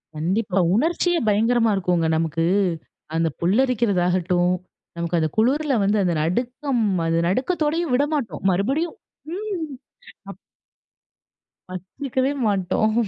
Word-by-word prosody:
கண்டிப்பா. 190 Hz, +5 st, 0 dB, 0.2 s
உணர்ச்சியே 340 Hz, -, +1 dB
பயங்கரமா 225 Hz, +2 st, +2 dB
இருக்கும்ங்க 180 Hz, -3 st, +1 dB
நமக்கு. 165 Hz, 0 st, 0 dB, 0.7 s
அந்த 165 Hz, 0 st, +2 dB
புல்லரிக்கிறதாகட்டும், 180 Hz, -5 st, +2 dB, 0.4 s
நமக்கு 170 Hz, 0 st, -1 dB
அந்த 160 Hz, -1 st, 0 dB
குளுருல 275 Hz, +5 st, +2 dB
வந்து 205 Hz, +2 st, +2 dB
அந்த 175 Hz, -2 st, +1 dB
நடுக்கம் 245 Hz, -, -1 dB, 0.2 s
அது 165 Hz, 0 st, +1 dB
நடுக்கத்தோடையும் 305 Hz, -, 0 dB
விடமாட்டோம். 270 Hz, -, -1 dB
மறுபடியும் 270 Hz, -, 0 dB, 0.4 s
ம் 380 Hz, -7 st, -4 dB, 0.6 s
அப் -, -, -10 dB, 1.3 s
வச்சுக்கவே 260 Hz, -, -2 dB
மாட்டோம். 205 Hz, +1 st, +1 dB
215 Hz, 95 wpm, -22 LUFS, 180-275 Hz, 1.3 s, பயங்கரமா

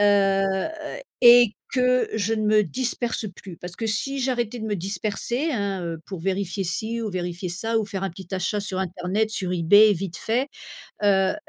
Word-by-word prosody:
Heu, 195 Hz, -1 st, +4 dB, 0.8 s
est 240 Hz, -2 st, +8 dB, 0.2 s
que 250 Hz, -1 st, +2 dB
je 220 Hz, 0 st, 0 dB
ne 215 Hz, -, -2 dB
me 215 Hz, 0 st, +5 dB
disperse 240 Hz, -1 st, -2 dB
plus. 185 Hz, -2 st, -10 dB
Parce 175 Hz, +1 st, -8 dB
que 225 Hz, -, -3 dB
si 230 Hz, +6 st, -1 dB
j'arrêtais 245 Hz, -2 st, -1 dB
de -, -, -4 dB
me 215 Hz, -1 st, -1 dB
disperser, 210 Hz, -, -2 dB
hein, 200 Hz, -5 st, -2 dB
heu, 165 Hz, -1 st, -5 dB
pour 190 Hz, -4 st, -6 dB
vérifier 195 Hz, +1 st, -2 dB
ci 220 Hz, +6 st, -2 dB
ou 215 Hz, -, -3 dB
vérifier 180 Hz, 0 st, -4 dB
ça 225 Hz, +6 st, 0 dB
ou 220 Hz, -, 0 dB
faire 195 Hz, -2 st, -5 dB
un 195 Hz, -, -1 dB
petit 180 Hz, +2 st, -11 dB
achat 190 Hz, +3 st, -1 dB
sur 195 Hz, -2 st, -4 dB
internet 185 Hz, +4 st, -1 dB
sur 185 Hz, -4 st, -2 dB
eBay 205 Hz, +5 st, +6 dB
vite 180 Hz, -2 st, -4 dB
fait. 245 Hz, +5 st, -1 dB, 0.5 s
Heu, 195 Hz, -2 st, +3 dB
205 Hz, 185 wpm, -24 LUFS, 185-225 Hz, 0.8 s, est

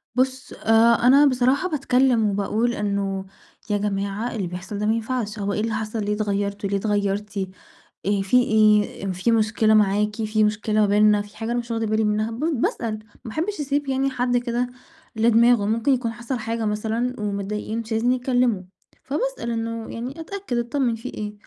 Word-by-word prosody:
بُصّ، 260 Hz, 0 st, -1 dB
أ -, -, -13 dB, 0.4 s
أنا 280 Hz, +3 st, +7 dB
بصراحة 265 Hz, +6 st, +2 dB
باتكلم 255 Hz, -, +2 dB
وباقول 210 Hz, +4 st, 0 dB
إنه 200 Hz, -2 st, -2 dB, 0.4 s
يا 205 Hz, -, +2 dB
جماعة 200 Hz, +3 st, -2 dB
اللي 195 Hz, -5 st, -2 dB
بيحصَل 180 Hz, +4 st, -6 dB
ده 210 Hz, -, -1 dB
ما 220 Hz, -, +3 dB
ينفعش، 225 Hz, -1 st, -3 dB
هو 200 Hz, 0 st, -1 dB
إيه -, -, -1 dB
اللي 225 Hz, 0 st, -1 dB
حصَل 215 Hz, 0 st, -3 dB
ليه 210 Hz, -, 0 dB
اتغيرتوا، 200 Hz, -1 st, -2 dB
ليه 200 Hz, -, +1 dB
اتغيرتِ، 205 Hz, 0 st, -1 dB, 0.7 s
إيه 200 Hz, 0 st, +1 dB
في 195 Hz, +6 st, +3 dB
إيه؟ 210 Hz, -3 st, +2 dB
في 185 Hz, +6 st, 0 dB
مشكلة 220 Hz, 0 st, +3 dB
معاكِ؟ 210 Hz, 0 st, +3 dB
في 215 Hz, 0 st, +1 dB
مشكلة 210 Hz, 0 st, +1 dB
ما -, -, +5 dB
بيننا؟ 210 Hz, 0 st, +4 dB
في 205 Hz, 0 st, -12 dB
حاجة 225 Hz, +1 st, -3 dB
أنا 240 Hz, -, 0 dB
مش 235 Hz, 0 st, -6 dB
واخدة 225 Hz, -1 st, -1 dB
بالي 220 Hz, 0 st, +1 dB
منها؟ 215 Hz, +1 st, 0 dB
ب 225 Hz, -, -7 dB, 0.2 s
باسأل، 215 Hz, -2 st, -1 dB, 0.3 s
ما 225 Hz, -, -6 dB
أحبش 345 Hz, -, -2 dB
أسيب 285 Hz, 0 st, -1 dB
يعني 270 Hz, +1 st, +1 dB
حد 245 Hz, -1 st, 0 dB
كده 240 Hz, 0 st, -1 dB, 0.5 s
لدماغُه، 230 Hz, 0 st, +4 dB
ممكن 230 Hz, +6 st, +2 dB
يكون 240 Hz, -3 st, -1 dB
حصَل 240 Hz, +2 st, -4 dB
حاجة 225 Hz, 0 st, -2 dB
مثلًا 220 Hz, +4 st, -1 dB
ومضايقين 210 Hz, +2 st, -3 dB
مش 230 Hz, 0 st, -7 dB
عايزين 225 Hz, +3 st, +2 dB
يتكلموا، 245 Hz, -5 st, +1 dB, 0.4 s
فباسأل 300 Hz, -, -2 dB
إنه 230 Hz, 0 st, -3 dB
يعني 250 Hz, +6 st, -6 dB
أتأكد 375 Hz, -6 st, -4 dB
أطمن 240 Hz, 0 st, 0 dB
في 230 Hz, +3 st, -7 dB
إيه، 210 Hz, 0 st, -5 dB
220 Hz, 180 wpm, -23 LUFS, 210-245 Hz, 0.7 s, أنا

